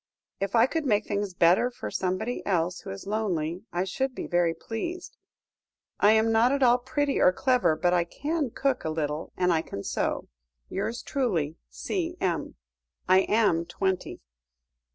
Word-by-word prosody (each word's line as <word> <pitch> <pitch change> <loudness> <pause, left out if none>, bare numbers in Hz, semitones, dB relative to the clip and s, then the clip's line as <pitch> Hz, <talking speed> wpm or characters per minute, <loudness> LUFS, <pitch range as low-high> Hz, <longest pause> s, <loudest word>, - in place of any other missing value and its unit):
If 195 +2 -2
I 225 - +6
could 320 +4 -2
make 210 -2 +2
things 200 -2 -2
better 175 +8 +4
for 240 - -7
somebody 190 +6 -2
else 175 -2 0
who - - -9
is 95 - -7
lonely, 190 -4 -2
I 175 +1 0
should 260 +7 -2
be - - -4
very 175 -2 +1
pleased. 335 - -5 0.8
I 205 +2 +6
am 220 +1 +3
not 225 +3 +4
at 280 -1 +1
all 245 0 +5
pretty 270 +3 -1
or 180 - +6
clever, 250 - +2
but 175 +3 +1
I 175 -1 +2
can 295 - -2
cook 270 +3 -1
a 160 - -2
little, 155 0 -3
and 180 -1 +3
I 160 - +2
can 100 -10 -7
sew. - - -2 0.4
"Yours 225 +5 -3
truly, 175 - -1
C.M. 335 - -3 0.5
"I 185 +1 +6
am 200 -5 +2
twenty." 190 -1 -2
200 Hz, 165 wpm, -27 LUFS, 175-250 Hz, 0.8 s, I